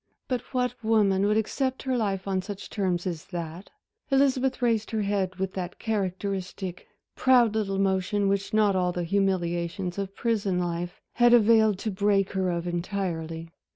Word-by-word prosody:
But 250 -3 -1
what 250 -2 0
woman 205 -3 +3
would 210 +1 +2
accept 260 +4 -1
her 260 -1 0
life 200 -5 -1
on 190 -1 0
such 200 +1 -8
terms 185 -4 -1
as 170 -4 -4
that? 170 +1 -6 0.4
Elizabeth 270 -1 +2
raised 230 -3 +1
her 220 -2 -1
head 195 -2 -1
with 190 0 -3
that 180 -1 -5
characteristic, 190 -3 -3 0.3
proud 245 -4 +4
little 200 -3 -1
motion 195 +1 +1
which 195 0 0
not 210 -2 +3
all 180 -1 +1
the 175 0 -3
humiliations 175 -1 -1
of 195 0 -4
prison 210 -5 0
life 175 0 -3 0.2
had 240 0 +7
availed 220 -2 +5
to 215 +2 -3
break 195 0 +2
her 190 -2 0
of 170 -1 -2
entirely. 170 -2 -3
195 Hz, 160 wpm, -27 LUFS, 180-220 Hz, 0.4 s, had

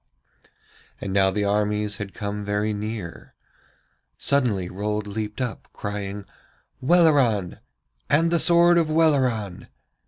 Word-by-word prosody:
And 95 - -5
now 95 -1 +4
the 100 +2 -1
armies 105 0 0
had 105 -2 -7
come 105 0 -4
very 105 +1 -1
near. 105 -4 -6 0.8
Suddenly 120 -10 +1
Rold 105 +3 -3
leaped 105 +2 -5
up, 125 -3 -4
crying: 100 -1 -5 0.6
'Welleran! 135 - +3 0.5
And 165 +3 +3
the 170 - +2
sword 170 +1 +5
of 160 -2 0
Welleran!' 130 - +1
105 Hz, 115 wpm, -24 LUFS, 100-140 Hz, 0.8 s, sword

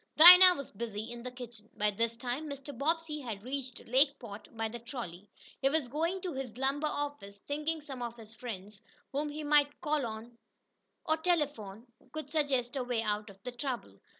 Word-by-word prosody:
Dinah 360 +3 +12
was 280 -4 -7
busy 220 +1 -5
in 240 0 -7
the 250 - -5
kitchen. 240 -4 -10
By 210 0 +2
this 230 +3 0
time 255 +6 -4
Mr. 280 0 -7
Bobbsey 310 +3 -1
had 225 -7 -6
reached 260 0 -5
Lakeport 255 -4 +1
by 225 0 0
the 240 +2 -7
trolley. 210 -6 -7 0.3
He 270 - +4
was 300 -2 +1
going 330 +8 -1
to 360 -3 -3
his 260 -4 -5
lumber 275 +3 +1
office, 290 -10 -4
thinking 300 +2 -1
some 270 -4 -8
of 235 0 -4
his 220 -1 -11
friends, 210 -4 -7 0.3
whom 295 +2 -1
he 300 +1 -5
might 290 -1 +3
call 300 -3 +1
on 230 +2 -8 0.7
the 315 - +3
telephone 285 - -1 0.3
could 310 0 -6
suggest 280 -5 +1
a 265 - 0
way 245 -2 -1
out 210 0 -1
of 195 - -13
the 250 - -4
trouble. 240 - -5
255 Hz, 185 wpm, -32 LUFS, 225-295 Hz, 0.7 s, Dinah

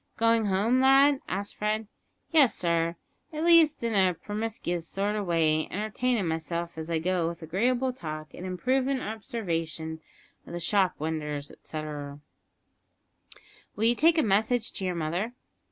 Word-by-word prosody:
"Going 230 -1 +3
home, 210 +6 +2
lad?" 270 +1 +5
asked 200 +2 -4
Fred. 215 +1 -1 0.4
"Yes, 295 -7 +5
sir 170 -1 0 0.4
at 310 0 -3
least 330 -5 +5
in 230 -1 0
a 190 -3 +3
permiscuous 205 -3 -4
sort 200 +4 -1
of 205 -3 -2
way 155 -2 +2
entertainin' 215 +1 -1
myself 170 +1 -3
as 160 0 -6
I 165 - +1
goes 175 0 0
with 170 0 -8
agreeable 245 +10 0
talk, 155 -8 -7
and - - -9
improvin' 255 +9 0
obsarvation 165 -9 -4 0.5
of - - -9
the 175 - -3
shop 190 +1 +2
winders, 150 -2 -3
etceterrer." 150 -2 -7 1.6
"Will 210 - -3
you 230 +1 +5
take 320 +6 +4
a 315 - +4
message 220 +3 +1
to 190 - -5
your 180 -1 -1
mother?" 170 +8 -2
195 Hz, 150 wpm, -28 LUFS, 165-230 Hz, 1.6 s, lad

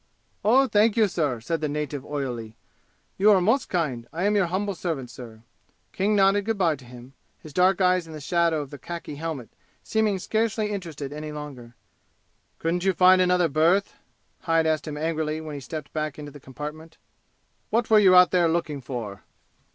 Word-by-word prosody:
"Oh, 255 +6 +5
thank 215 0 +3
you, 220 -2 +5
sir!" 150 -10 -1
said 165 +6 -2
the 150 - -1
native 145 -2 -4
oilily. 125 -7 -5 0.6
"You 205 +2 +5
are 200 -3 +6
most 225 +9 +1
kind! 135 -10 -2
I 170 +3 -3
am 205 +1 +2
your 195 -3 +3
humble 200 +3 -2
servant, 155 -9 -4
sir!" 110 -2 -11 0.5
King 205 +3 0
nodded 195 0 +3
good 225 -1 -1
by 170 -5 +2
to 130 -3 -16
him, 125 +2 -13 0.3
his 155 - -13
dark 185 +2 +3
eyes 180 -2 +2
in 160 - -10
the 155 - -7
shadow 165 +1 +1
of 140 - -13
the 145 - -9
khaki 170 -4 -7
helmet 155 -7 -5 0.3
seeming 215 -3 +1
scarcely 215 +2 -1
interested 160 -8 -5
any 150 0 -6
longer. 135 -6 -9 0.8
"Couldn't 170 +2 -1
you 190 0 +2
find 185 +1 +6
another 180 -1 +3
berth?" 165 +7 +2 0.5
Hyde 165 -1 +1
asked 155 -1 0
him 150 -1 -5
angrily 155 0 -2
when 155 -1 -7
he 140 - -6
stepped 150 +2 -7
back 155 -2 -3
into 145 -1 -8
the 145 - -12
compartment. 150 +4 -9 0.7
"What 230 +1 0
were 215 - +8
you 190 -3 +6
out 180 -1 +7
there 175 -2 +3
looking 160 -4 -2
for?" 115 -6 -6
165 Hz, 190 wpm, -25 LUFS, 145-190 Hz, 0.8 s, were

